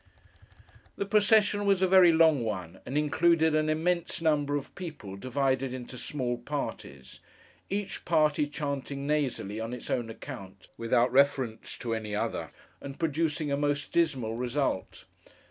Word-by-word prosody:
The 200 - -2
procession 205 0 +4
was 195 -1 +3
a - - +5
very 185 -2 +7
long 160 -5 +4
one, 95 -5 -4
and 135 +4 -2
included 160 +2 +3
an 155 0 +2
immense 170 +2 0
number 150 -3 +1
of 145 - -4
people 155 - -7
divided 130 +3 -1
into 125 0 -8
small 125 -2 -3
parties; 65 -1 -6 0.5
each 200 0 -3
party 150 -3 +2
chanting 140 -1 -4
nasally, 135 -8 -1
on 115 +2 -4
its 125 - -7
own 120 -2 -1
account, 100 -6 -10
without 120 +1 +2
reference 130 -4 +1
to 115 -2 -3
any 110 -2 -3
other, - - -2 0.3
and 140 0 -8
producing 155 -2 -1
a 140 - +1
most 145 0 -1
dismal 135 -10 +1
result. 125 -3 -2
140 Hz, 145 wpm, -29 LUFS, 120-160 Hz, 0.5 s, very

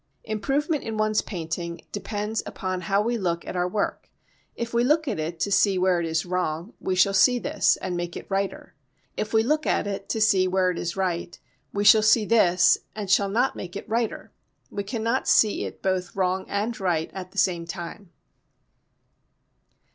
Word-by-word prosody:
Improvement 275 - -1
in 220 -1 -4
one's 215 0 +2
painting 170 -2 -5
depends 210 +1 -3
upon 185 -1 -4
how 195 +4 +1
we 235 +1 -1
look 170 -3 -2
at - - -6
our 180 0 +1
work. 200 +3 -2 0.5
If 235 0 -5
we 235 0 +3
look 305 +4 +2
at 205 - -2
it 160 +2 -4
to 200 - 0
see 195 -1 +3
where 180 -1 +2
it 170 - -2
is 160 +1 -1
wrong, 180 +2 -2
we 185 - -1
shall 195 +2 +4
see 245 +6 +5
this - - +2
and 180 - -4
make 175 0 -4
it - - -8
righter. 195 0 -3 0.4
If 215 - -3
we 220 -1 +3
look 305 +5 0
at - - +1
it 200 -1 -5
to 225 - -1
see 195 -4 +4
where 185 0 +2
it 175 - -5
is 170 +2 -4
right, 175 -2 -2 0.3
we 205 - -1
shall 215 +1 +8
see 215 0 +4
this 185 -5 +4 0.2
and 205 -3 -4
shall 200 0 +4
not 245 +6 +1
make 180 0 -7
it 200 - -6
righter. 230 0 -2 0.4
We 200 - -3
cannot 230 +4 -2
see 215 -2 +3
it - - -9
both 185 -2 -1
wrong 190 0 0
and 215 +3 -2
right 170 -4 0
at 185 -1 -7
the - - -16
same 175 -4 +1
time. 170 +2 -7
195 Hz, 190 wpm, -25 LUFS, 180-220 Hz, 0.5 s, shall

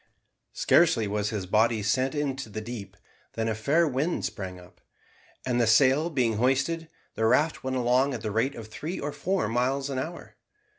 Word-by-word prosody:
Scarcely 160 -11 +3
was 105 0 -1
his 105 -4 -3
body 110 +2 +2
sent 130 +6 +1
into 140 -4 -2
the 110 - -5
deep, 105 -3 -8 0.4
than 115 0 -2
a 110 - 0
fair 145 +10 +2
wind 145 +5 -1
sprang 95 -4 -5
up, 90 0 -18 0.6
and 120 -1 +1
the 115 - +2
sail 135 +8 +4
being 125 -8 0
hoisted, 140 +7 0 0.2
the 110 - +1
raft 150 +7 +2
went 130 0 -2
along 125 +2 +2
at 115 - -6
the 110 - -2
rate 115 +6 0
of 115 -2 -8
three 155 - -5
or 145 - -3
four 185 - -1
miles 130 +5 0
an 130 - -2
hour. 165 +6 -7
125 Hz, 185 wpm, -27 LUFS, 110-140 Hz, 0.6 s, sail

